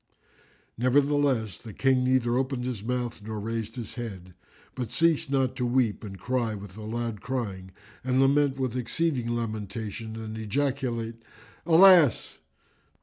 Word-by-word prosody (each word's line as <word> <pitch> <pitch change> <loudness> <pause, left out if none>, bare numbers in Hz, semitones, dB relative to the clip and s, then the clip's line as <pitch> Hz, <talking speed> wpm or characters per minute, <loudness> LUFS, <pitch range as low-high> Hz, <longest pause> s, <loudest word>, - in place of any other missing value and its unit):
Nevertheless, 135 -5 +2
the 110 -3 -10
King 130 -1 +3
neither 125 -2 +2
opened 130 -1 -1
his 125 -5 -3
mouth 120 0 -3
nor 110 +1 -5
raised 115 +2 -4
his 120 -4 -6
head, 95 -7 -7 0.4
but 125 -4 -4
ceased 165 +1 +2
not 135 -2 +1
to 125 - -1
weep 120 -3 +1
and 95 -2 -7
cry 120 +2 -1
with 100 -2 -10
a 110 - -9
loud 115 -1 -4
crying 105 -7 -4 0.3
and 130 0 +1
lament 135 0 +3
with 130 -3 -2
exceeding 125 +1 -1
lamentation 110 -1 -4
and 110 0 -6
ejaculate, 115 -1 -2 0.5
"Alas!" 170 - +6
120 Hz, 140 wpm, -27 LUFS, 110-130 Hz, 0.5 s, Alas